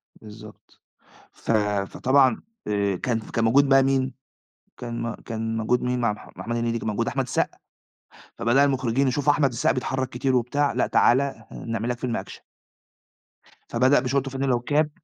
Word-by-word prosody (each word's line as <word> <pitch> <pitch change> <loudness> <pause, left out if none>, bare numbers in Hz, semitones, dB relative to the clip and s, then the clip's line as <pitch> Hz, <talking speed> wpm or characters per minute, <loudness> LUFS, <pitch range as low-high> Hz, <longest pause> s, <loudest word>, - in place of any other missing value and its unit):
بالضبط، 105 0 -14 0.5
ف - - -5 0.4
فطبعًا 130 -2 +2 0.3
آآ، 100 -2 0
كان 115 +4 -1
كان 115 +1 -3
موجود 140 +5 +4
بقى 135 0 +6
مين، 135 -1 +1 0.6
كان 120 -1 -5
م 115 -1 -3
كان 115 0 -4
موجود 115 +3 +1
مين 125 0 -1
مع 115 -3 +2
مح 105 - -11
محمد 115 +1 -4
هنيدي، 115 0 -1
كان - - -5
موجود 105 - -1
أحمد - - 0
السقا، - - -1 0.8
فبدأ 130 +5 +3
المخرجين 135 -1 +1
يشوفوا 145 +3 +2
أحمد 145 -2 +2
السقا 120 -1 +1
بيتحرّك 130 0 -2
كتير 130 +1 0
وبتاع، 140 +4 +1
لأ - - +1
تعالَ 130 +3 +4
ه 135 -6 -5
هنعمل 115 0 -4
لك 120 - -2
فيلم 125 -3 -2
أكشن. - - -8 1.3
فبدأ 130 +3 +4
بشورت 135 +2 -1
وفانلة 135 -1 0
وكاب. 150 +5 +1
125 Hz, 165 wpm, -24 LUFS, 115-135 Hz, 1.3 s, بقى